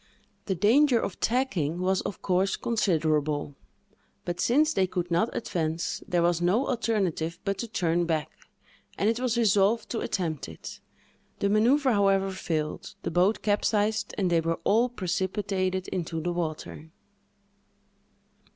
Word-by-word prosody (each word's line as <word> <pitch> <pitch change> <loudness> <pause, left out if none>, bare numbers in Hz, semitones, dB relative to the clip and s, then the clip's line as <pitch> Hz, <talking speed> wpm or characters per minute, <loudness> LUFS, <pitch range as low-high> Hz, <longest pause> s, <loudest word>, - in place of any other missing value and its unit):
The 190 - 0
danger 240 - +4
of 200 - -4
tacking 195 - 0
was, 185 +1 +1
of 200 - -6
course, 185 +1 +1
considerable; 155 -9 0 0.7
but, 175 0 -3
since 305 - +3
they 190 -1 +2
could 180 -1 -3
not 175 +7 +2
advance, 165 -5 -2
there 175 -1 +1
was 175 0 +2
no 200 +10 +2
alternative 205 - -1
but 195 -1 -1
to 235 - -3
turn 175 -5 0
back, 155 -3 -1 0.7
and 200 - +1
it 230 +1 0
was 250 -2 0
resolved 215 0 +2
to 230 - -1
attempt 160 - -3
it. 80 - -9 0.6
The 200 - 0
manœuvre, 250 +6 +3
however, 195 -1 +2
failed; 155 -5 -3
the - - -2
boat 180 +6 +2
capsized, 210 +1 +1
and 185 -3 +1
they 165 -1 +3
were 165 0 -1
all 230 +4 +3
precipitated 185 -2 -2
into 165 -2 -3
the 175 +2 -2
water. 150 - -5
190 Hz, 140 wpm, -27 LUFS, 170-220 Hz, 0.7 s, danger